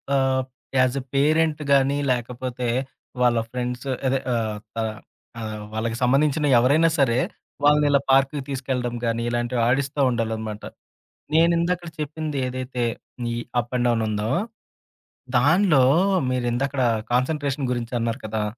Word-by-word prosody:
ఆహ్, 130 Hz, -1 st, +2 dB, 0.3 s
as 130 Hz, 0 st, +3 dB
a -, -, -12 dB
parent 155 Hz, +2 st, +2 dB
గాని, 140 Hz, 0 st, +4 dB
లేకపోతే 125 Hz, 0 st, -3 dB, 0.5 s
వాళ్ళ 120 Hz, -1 st, +4 dB
ఫ్రెండ్సూ 125 Hz, +1 st, -4 dB, 0.2 s
అదే 135 Hz, +1 st, +1 dB
ఆహ్, 110 Hz, -2 st, -1 dB, 0.2 s
త -, -, -11 dB, 0.6 s
ఆహ్, 110 Hz, -1 st, -5 dB
వాళ్ళకి 115 Hz, +1 st, -2 dB
సంబంధించిన 145 Hz, +4 st, +2 dB
ఎవరైనా 145 Hz, +7 st, +4 dB
సరే, 125 Hz, -3 st, +3 dB, 0.5 s
వాళ్ళని 150 Hz, 0 st, +5 dB
ఇలా 140 Hz, -1 st, +4 dB
పార్కుకి 135 Hz, +1 st, +3 dB
తీసుకెళ్ళడం 125 Hz, -3 st, -2 dB
గాని, 115 Hz, 0 st, 0 dB
ఇలాంటివి 120 Hz, 0 st, -1 dB
ఆడిస్తా 140 Hz, +3 st, 0 dB
ఉండాలనమాట. 110 Hz, -3 st, -3 dB, 0.7 s
నేను 165 Hz, +2 st, +5 dB
ఇందకడ 175 Hz, 0 st, -1 dB
చెప్పింది 150 Hz, -1 st, -3 dB
ఏదైతే 125 Hz, -1 st, -3 dB, 0.5 s
ఈ -, -, -2 dB, 0.2 s
అప్ 120 Hz, 0 st, -4 dB
అండ్ 125 Hz, 0 st, +1 dB
డౌనుందో? 110 Hz, -2 st, 0 dB, 1.1 s
దానిలో 155 Hz, +1 st, +4 dB, 0.5 s
మీరు 125 Hz, -1 st, -1 dB
ఇందకడ, 135 Hz, +2 st, -1 dB, 0.3 s
కాన్సంట్రేషన్ 140 Hz, +1 st, 0 dB
గురించి 120 Hz, -1 st, -3 dB
అన్నారు 115 Hz, +2 st, -2 dB
కదా! 110 Hz, 0 st, -2 dB
130 Hz, 125 wpm, -23 LUFS, 120-140 Hz, 1.1 s, వాళ్ళని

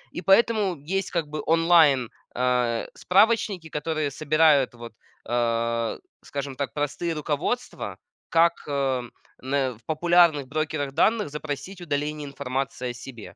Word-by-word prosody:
И -, -, -3 dB
поэтому 205 Hz, -1 st, +3 dB, 0.2 s
есть 195 Hz, -, -3 dB
как 170 Hz, -3 st, 0 dB
бы 150 Hz, 0 st, -5 dB
онлайн, 160 Hz, -7 st, +4 dB, 0.3 s
э, 125 Hz, -2 st, +1 dB
справочники, 195 Hz, -4 st, +2 dB
которые 155 Hz, -1 st, -2 dB
собирают 155 Hz, -3 st, +3 dB
вот, 120 Hz, -1 st, -10 dB, 0.4 s
э, 115 Hz, -1 st, 0 dB, 0.2 s
скажем 140 Hz, -1 st, -5 dB
так, 135 Hz, -5 st, -4 dB
простые 150 Hz, +3 st, -2 dB
руководства, 155 Hz, -, -3 dB, 0.3 s
как, 170 Hz, +1 st, +4 dB
э, 135 Hz, -3 st, 0 dB, 0.4 s
н 135 Hz, -1 st, 0 dB
в 115 Hz, -, -28 dB
популярных 165 Hz, -2 st, +4 dB
брокерах 150 Hz, -1 st, -2 dB
данных 220 Hz, +4 st, +2 dB
запросить 150 Hz, +5 st, -6 dB
удаление 150 Hz, -1 st, -2 dB
информации 135 Hz, -2 st, -3 dB
о 120 Hz, -, -4 dB
себе. 120 Hz, -2 st, -10 dB
145 Hz, 125 wpm, -25 LUFS, 130-170 Hz, 0.4 s, онлайн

